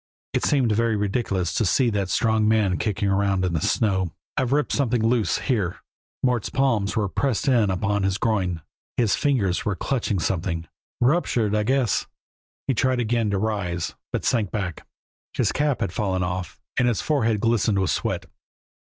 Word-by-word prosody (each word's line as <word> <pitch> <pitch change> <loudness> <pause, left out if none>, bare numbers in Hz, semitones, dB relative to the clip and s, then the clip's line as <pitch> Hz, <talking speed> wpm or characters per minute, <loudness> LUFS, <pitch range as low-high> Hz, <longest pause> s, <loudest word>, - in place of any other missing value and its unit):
It - - 0
seemed 130 -6 +2
very 115 +1 +2
ridiculous 100 -4 -1
to - - +1
see 120 +5 +2
that 100 -3 -1
strong 110 0 +2
man 105 -5 +2
kicking 100 -1 -1
around 95 -1 +1
in 90 - -1
the 80 - 0
snow. 95 -6 +1 0.2
"I've 125 - 0
ripped 145 +1 +1
something 125 -5 +1
loose 115 -2 +2
here." 105 -10 -1 0.5
Mort's 125 -4 +1
palms 115 -7 +1
were 105 -2 +1
pressed 130 +5 -1
in 120 -6 +4
upon 105 +2 0
his 95 0 0
groin, 95 -8 0 0.3
his 115 -4 +3
fingers 110 -11 +1
were 105 - -1
clutching 120 -2 -1
something. 85 -1 -2 0.3
"Ruptured 120 -6 +2
I 105 - +2
guess." 130 0 +1 0.6
He 135 - +1
tried 130 +1 +1
again 115 -2 +1
to 100 - 0
rise, 95 -5 -2 0.2
but - - -2
sank 110 -6 +1
back. 90 -5 -4 0.5
His - - +1
cap 145 -2 0
had 95 - -1
fallen 95 -3 0
off 90 -1 -4 0.2
and 125 - +3
his 120 -4 +1
forehead 115 -8 +1
glistened 110 -2 +2
with 95 -1 +1
sweat. - - -2
105 Hz, 170 wpm, -24 LUFS, 95-120 Hz, 0.6 s, in